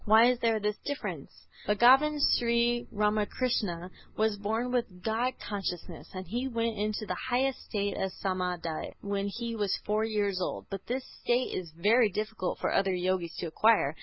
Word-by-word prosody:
Why 225 +3 +7
is 250 - -3
there 225 -2 +2
this 210 0 -1
difference? 285 0 -4 0.4
Bhagavan 265 +8 +6 0.2
Sri 235 0 +1
Ramakrishna 210 -3 0 0.3
was 220 -1 +2
born 220 +5 -2
with 210 -8 -2
God 230 +3 0
consciousness, 195 -4 -5
and 185 0 -5
he 240 +8 -2
went 230 -2 -1
into 210 +1 -2
the 185 - -2 0.2
highest 260 +2 +1
state 200 -2 -1
of 190 - -1
Samâdhi 180 -4 -2
when 200 0 -2
he 230 +3 -4
was 205 -3 0
four 210 +1 +1
years 205 -4 0
old; - - -3
but 195 -1 -6
this 255 +2 -2 0.2
state 245 +1 +1
is 180 -3 -4
very 215 +7 +4
difficult 210 -1 -3
for - - -1
other 195 0 +2
Yogis 180 -1 -1
to - - -3
acquire. 165 -3 +3
215 Hz, 165 wpm, -30 LUFS, 190-235 Hz, 0.4 s, Why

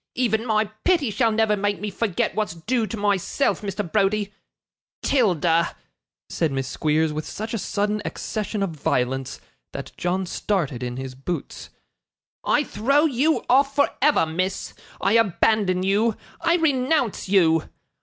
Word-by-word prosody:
Even 230 -2 0
my 215 -1 +2 0.2
pity 330 -10 +2
shall 230 +1 +2
never 220 -1 +2
make 205 0 -1
me 210 0 -4
forget 200 -2 -1
what's 215 -6 -2
due 220 +7 -1
to 225 - -5
myself, 205 +6 0
Mr. 205 -1 -3
Browdie. 205 0 +1 0.7
'Tilda,' 175 - +2 0.5
said 160 -3 -1
Miss 135 -1 -2
Squeers, 155 +2 0
with 155 0 -4
such 220 +2 -5
a 225 - -1
sudden 205 +2 -1
accession 210 -1 -3
of 195 - -2
violence 135 -3 -1 0.3
that - - -6
John 185 +2 -1
started 170 - -2
in 125 0 -4
his 130 0 -5
boots, 135 +7 -6 0.7
'I 295 - +2
throw 275 +7 +2
you 295 +2 +1
off 275 +2 +3
for 285 0 +4
ever, 290 - +4
miss. 185 +4 -3 0.3
I 195 - +1
abandon 200 -3 +2
you. 205 +3 +2 0.2
I 335 - +3
renounce 265 - +1
you. 165 -5 +3
205 Hz, 145 wpm, -23 LUFS, 170-230 Hz, 0.7 s, for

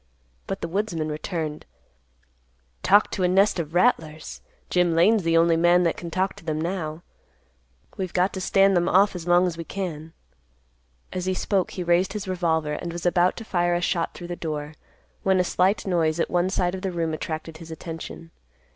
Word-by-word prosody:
But 195 - -4
the - - -2
woodsman 170 -4 -2
returned, 155 0 -4 1.2
"Talk 205 +2 +4
to 195 - -3
a 180 - +3
nest 195 +1 +3
of 160 0 -4
rattlers! 160 -7 0 0.3
Jim 180 -2 +2
Lane's 205 +6 +4
the 165 -1 +2
only 165 0 +4
man 175 +2 +4
that 170 - +1
can 170 - -7
talk 190 +3 -1
to - - -13
them 155 -2 -2
now. 165 -1 -3 0.9
We've 185 -2 -3
got 185 +2 +1
to 190 - -4
stand 195 +1 +4
them 175 -1 +2
off 195 +1 +4
as 175 -1 -6
long 175 +1 +5
as 170 -2 -3
we - - -3
can." 165 -4 -5 1.0
As 185 0 -3
he 185 - +1
spoke 190 -1 0
he 180 - -5
raised 175 +2 +2
his 210 -2 -5
revolver, 160 -4 0
and 170 +3 -4
was 170 +1 -6
about 175 +1 +3
to 230 - -7
fire 175 -3 +1
a 175 - -1
shot 175 -1 -1
through 175 -1 -8
the 175 - -3
door, 150 -2 -5 0.5
when 190 -1 +2
a - - +4
slight 185 +3 +1
noise 170 -3 +1
at - - 0
one 175 +1 +2
side 180 -2 0
of 190 - -5
the 190 -1 -2
room 165 -2 -2
attracted 155 0 -5
his 165 0 -11
attention. 165 0 -8
175 Hz, 200 wpm, -24 LUFS, 165-185 Hz, 1.2 s, long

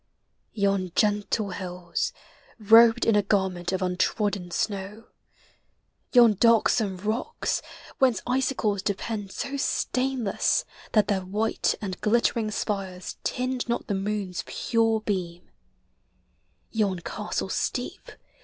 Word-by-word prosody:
Yon 195 -3 0
gentle 210 0 +1
hills, 180 -2 -3 0.5
Robed 225 +2 +6
in 225 - +4
a 205 - +5
garment 190 -3 0
of 190 0 -1
untrodden 185 +1 0
snow: 200 +4 -3 1.1
Yon 240 -3 +7
darksome 220 -2 +3
rocks, 220 - -2 0.4
whence 255 -4 +4
icicles 250 -5 0
depend 200 0 -3
So 280 +5 -4
stainless 255 -5 0 0.3
that 210 -3 +4
their 200 -2 +1
white 210 +4 0
and 185 -2 -5
glittering 230 0 +2
spires 195 -3 -4
Tinge 255 -1 -2
not 235 - -1
the 205 - -2
moon's 195 -2 -2
pure 225 -2 +1
beam; 180 -5 -4 1.2
yon 205 -4 0
castle - - -4
steep. - - -3
210 Hz, 105 wpm, -26 LUFS, 190-230 Hz, 1.2 s, Yon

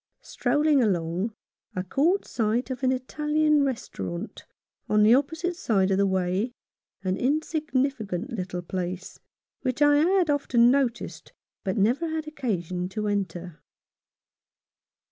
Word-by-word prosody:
Strolling 295 -2 +2
along, 185 +1 0 0.4
I 185 - -1
caught 320 - +1
sight 230 +3 -1
of 255 - -5
an 260 -1 +3
Italian 300 +3 +1
restaurant 95 - -4 0.4
on 210 0 +4
the 220 +2 +7
opposite 320 +7 +1
side 200 - +1
of 190 - +2
the 200 - +4
way, 190 +5 0 0.5
an 185 0 0
insignificant 270 - -1
little 180 -5 -4
place, 185 +1 -5 0.4
which 255 0 -2
I 290 0 +5
had 350 +1 +3
often 245 -4 +4
noticed, 260 -4 -1 0.3
but 195 +2 -2
never 245 +11 +2
had 315 0 -3
occasion 185 - -3
to 210 +2 -3
enter. 180 -6 -3
235 Hz, 125 wpm, -26 LUFS, 190-290 Hz, 0.5 s, the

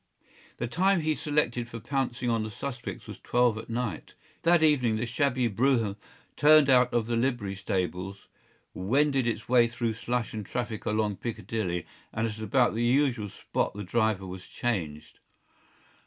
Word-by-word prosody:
The 120 - -2
time 180 +8 +2
he 155 0 +1
selected 135 -6 -1
for 115 - -7
pouncing 125 -1 -2
on 115 -2 +1
the 110 - -3
suspects 125 +2 -6
was - - -9
twelve 120 -2 +2
at 110 - -10
night. 115 -8 -4 0.3
That 170 -1 +4
evening 130 -8 +3
the 110 +2 -1
shabby 125 0 +1
brougham 115 -2 +1 0.4
turned 150 -2 +6
out 125 -1 +5
of 120 -2 +1
the 120 +1 -1
livery 120 -5 0
stables, 95 0 -3 0.5
wended 135 +6 +1
its 115 -1 -2
way 120 -1 +5
through 115 -1 -2
slush 120 +1 -2
and 110 -1 -4
traffic 115 0 -4
along 105 -2 0
Piccadilly, 100 -6 -3 0.3
and 115 - -1
at 110 0 -6
about 120 +3 +2
the 115 +2 -1
usual 120 -4 +2
spot - - -2
the 105 - -5
driver 110 0 0
was 90 0 -8
changed. 85 -11 -3
120 Hz, 160 wpm, -28 LUFS, 105-130 Hz, 0.5 s, turned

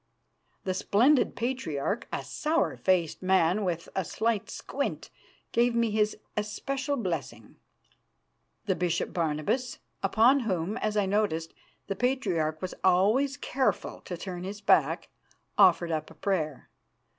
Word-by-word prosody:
The 185 - -1
splendid 240 +9 +3
Patriarch, 230 - -2
a - - -3
sour 315 +2 0
faced 180 -4 +1
man 185 +1 +3
with 170 -3 -2
a 190 - +1
slight 220 +3 -1
squint, - - -4 0.4
gave 235 0 +2
me 230 -2 +2
his 210 0 +1 0.2
especial 270 +7 -2
blessing. 155 - -4 1.1
The - - +2
Bishop 175 -2 -1
Barnabas, 165 - -1 0.2
upon 245 +5 +4
whom, 195 -4 -1
as 215 -2 -1
I 205 - +3
noted, 190 -5 0 0.3
the 195 - -3
Patriarch 185 - 0
was 185 - -3
always 215 +10 +3
careful 265 -2 -1
to 175 - -5
turn 180 -1 -6
his 200 +2 -5
back, 205 - +2 0.5
offered 180 -4 +5
up 155 -1 -2
a 160 - -14
prayer. 155 -6 -2
195 Hz, 130 wpm, -28 LUFS, 170-235 Hz, 1.1 s, offered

